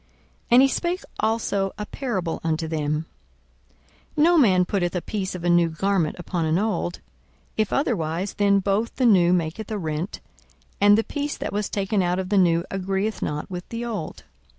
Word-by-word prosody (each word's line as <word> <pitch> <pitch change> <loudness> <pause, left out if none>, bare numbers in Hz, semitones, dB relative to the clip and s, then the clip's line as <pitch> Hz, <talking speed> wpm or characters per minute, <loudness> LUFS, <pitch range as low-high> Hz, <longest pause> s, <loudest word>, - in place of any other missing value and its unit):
42:005:036 - - -36 0.4
And 245 +1 +7
he - - +6
spake 345 +6 -1 0.2
also 205 -3 0
a 210 - -4
parable 200 -11 -3
unto 160 0 -1
them; 155 0 -1 1.1
No 335 +4 +5
man 190 - +5
putteth 180 -2 -1
a 180 - 0
piece 195 -3 -3
of 175 - -7
a 175 - +1
new 175 -1 +4
garment 175 -1 0
upon 175 -1 -3
an 160 +1 +2
old; 205 -4 -1 0.5
if 215 -2 0
otherwise, 190 - -1
then 200 -1 +3
both 200 +4 0
the 255 - +1
new 180 -6 +5
maketh 180 +4 -1
a 215 - -2
rent, 160 +1 -3 0.6
and 205 +1 +7
the 225 - +2
piece 290 +3 -3
that - - -4
was 210 0 -1
taken 200 0 0
out 180 0 +1
of 185 -1 -3
the 205 -1 +4
new 170 -1 +3
agreeth 195 +3 -2
not 150 0 -3
with 180 -1 -6
the 235 +1 -4
old. 210 -9 -5
195 Hz, 185 wpm, -24 LUFS, 175-215 Hz, 1.1 s, And